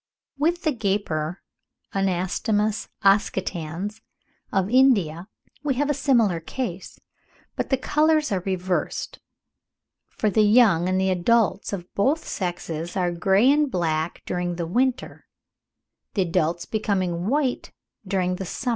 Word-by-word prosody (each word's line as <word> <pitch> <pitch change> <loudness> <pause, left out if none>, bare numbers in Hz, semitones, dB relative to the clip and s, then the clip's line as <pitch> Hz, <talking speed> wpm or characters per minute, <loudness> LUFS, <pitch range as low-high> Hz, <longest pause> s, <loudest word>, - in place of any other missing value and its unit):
With 340 +4 +1
the 310 - +2
gaper 195 - -2 0.5
(Anastomus 195 +3 0 0.2
oscitans) 195 0 0 0.5
of 190 -1 +1
India 200 - +3 0.4
we 280 -3 0
have 290 +3 +1
a - - +2
similar 230 - +2
case, 185 +1 -6 0.6
but - - -3
the 265 - +2
colours 305 +2 +2
are 195 - +1
reversed: 185 0 -2 0.9
for 215 - -1
the 215 - +3
young 210 -5 +5
and 185 0 +1
the 190 0 +2
adults 200 +2 +1
of 180 -3 -6
both 280 +11 +1
sexes 175 -2 -4
are 180 -1 +1
grey 195 +8 +3
and 295 0 +2
black 160 -5 -1
during 175 -1 -2
the 170 -1 -3
winter, 250 +8 -1 0.9
the 195 - +3
adults 170 0 0
becoming 185 -5 -1
white 270 0 0 0.4
during 185 -1 0
the 190 - -5
summer. 245 +8 -4
195 Hz, 130 wpm, -24 LUFS, 175-240 Hz, 0.9 s, young